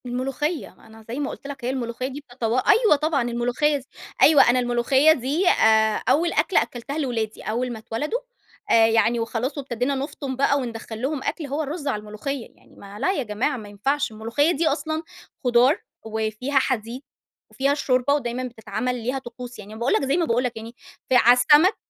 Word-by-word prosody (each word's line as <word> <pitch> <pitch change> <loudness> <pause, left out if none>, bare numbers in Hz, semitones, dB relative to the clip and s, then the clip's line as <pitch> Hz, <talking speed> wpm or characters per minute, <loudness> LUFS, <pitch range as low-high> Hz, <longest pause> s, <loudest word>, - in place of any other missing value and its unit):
الملوخيّة. 270 +6 -3
أنا 220 0 -16
زي 240 +5 -5
ما 285 - -2
قُلت - - -9
لك 270 -3 -7
هي - - 0
الملوخيّة 255 -1 -3
دي 270 +2 -7
بتتوا 245 -1 -1
أيوَه 445 -8 +6
طبعًا. 305 -1 0
الملوخيّة 245 +5 +1
س - - -15 0.4
أيوه، 290 -5 +7
أنا 250 +1 +3
الملوخيّة 250 +5 +3
دي 295 +7 -1
آآ 220 -6 +3
أول 335 +3 +2
أكلة 320 +4 +3
أكّلتها 240 +5 -5
لولادي، 235 -7 -2
أول 245 +3 -2
ما 225 - -7
اتولدوا 290 - -3 0.5
آآ 225 -1 +6
يعني 225 +1 +2
وخلاص 235 +5 -3
وابتدينا 260 0 -2
نُفطُم 275 -1 -4
بقى 280 +2 +2
وندخّل 230 -3 -6
لهم 270 +1 -2
أكل، 320 - -3
هو 285 +3 -2
الرُز 295 +1 -5
على 255 -7 0
الملوخيّة. 215 +5 -5
يعني - - -23
ما 200 +1 -11
لأ 375 - +1
يا 285 - -1
جماعة 235 +6 -1
ما 210 -3 -9
ينفعش، 270 +7 -1
الملوخيّة 230 +9 0
دي 330 0 0
أصلًا 315 +2 -1 0.4
خضار، 250 +5 +4 0.3
وفيها 220 +5 -1
حديد، 245 -1 -2 0.5
وفيها 275 +1 +1
الشوربة 280 -1 +1
ودايمًا 255 -3 -2
بتتعمل 230 0 -3
ليها 255 +3 -1
طقوس. 250 0 -10
يعني 210 0 -10
أنا 220 - -9
باقول 240 +3 +1
لك - - +2
زي 275 +4 +1
ما 340 - +2
باقول 240 -2 +1
لك 245 -2 -3
يعني 225 +2 -9 0.3
في 260 - +3
على 245 0 +7
السَمَك 300 - +5
255 Hz, 190 wpm, -23 LUFS, 230-285 Hz, 0.5 s, أيوه